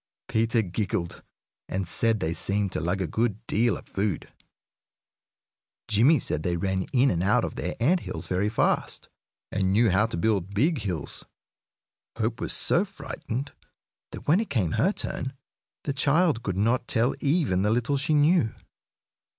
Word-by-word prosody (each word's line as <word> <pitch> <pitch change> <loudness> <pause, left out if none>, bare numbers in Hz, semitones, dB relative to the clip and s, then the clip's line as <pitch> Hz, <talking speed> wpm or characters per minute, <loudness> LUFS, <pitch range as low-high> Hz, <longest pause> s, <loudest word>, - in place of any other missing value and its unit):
Peter 115 +1 +1
giggled, 95 -1 -3 0.5
and 95 -1 -2
said 115 +4 +1
they 80 -2 -1
seemed 100 +3 0
to - - -2
lug 90 +3 -1
a - - -2
good 110 +4 -1
deal 115 -3 +1
of - - -13
food. 100 -3 -3 1.5
Jimmie 115 +9 +5
said 75 - -2
they 85 +2 -1
ran 95 +1 -1
in 130 +1 +4
and 85 - -1
out 100 +3 +3
of - - -5
their - - -4
ant 165 +10 +3
hills - - -5
very 95 +3 0
fast, 110 - 0 0.4
and 95 -1 0
knew 110 +2 +4
how 105 +4 +3
to 115 - -5
build 100 0 0
big 145 - +2
hills. 90 -8 -3 0.9
Hope 115 0 -2
was - - 0
so - - +3
frightened 135 +5 -6 0.6
that, - - -9
when 160 +6 +5
it 225 - -3
came 100 - 0
her 135 - +2
turn, 130 -9 -3 0.5
the 140 - -2
child 145 -1 +2
could 95 -6 -3
not 115 +4 +1
tell 120 +4 +2
even 140 - +1
the 105 - +2
little 120 +5 +1
she 150 +3 +1
knew. 150 -5 +3
110 Hz, 165 wpm, -26 LUFS, 95-130 Hz, 1.5 s, Jimmie